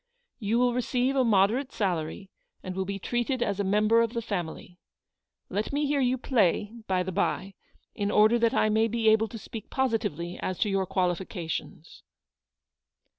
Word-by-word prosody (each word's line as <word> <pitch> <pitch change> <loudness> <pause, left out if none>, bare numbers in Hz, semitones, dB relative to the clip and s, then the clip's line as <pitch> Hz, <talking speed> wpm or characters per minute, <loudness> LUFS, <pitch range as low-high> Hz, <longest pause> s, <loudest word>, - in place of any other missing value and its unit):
You 220 +2 0
will 245 0 +3
receive 250 +2 0
a 265 - +4
moderate 225 +5 +2
salary, 185 0 -2 0.3
and 185 0 -5
will 190 0 -1
be 200 +1 -3
treated 240 +5 -1
as 205 -3 -2
a - - +1
member 210 +4 +3
of 230 0 0
the 235 - -2
family. 180 -3 -5 0.7
Let 210 +2 -2
me 290 +1 0
hear 285 0 +1
you 255 -1 +2
play, 215 -4 +1
by 185 -1 +1
the 190 - -4
by, 195 +1 -1 0.4
in 205 -1 -2
order 215 +3 +4
that 230 +2 +2
I - - +3
may 220 +1 +3
be 225 0 +2
able 220 0 +4
to 225 - -8
speak 220 0 -9
positively 215 -9 -1
as 185 - -3
to 210 - +2
your 195 -1 0
qualifications." 175 -3 -3
210 Hz, 175 wpm, -27 LUFS, 190-235 Hz, 0.7 s, a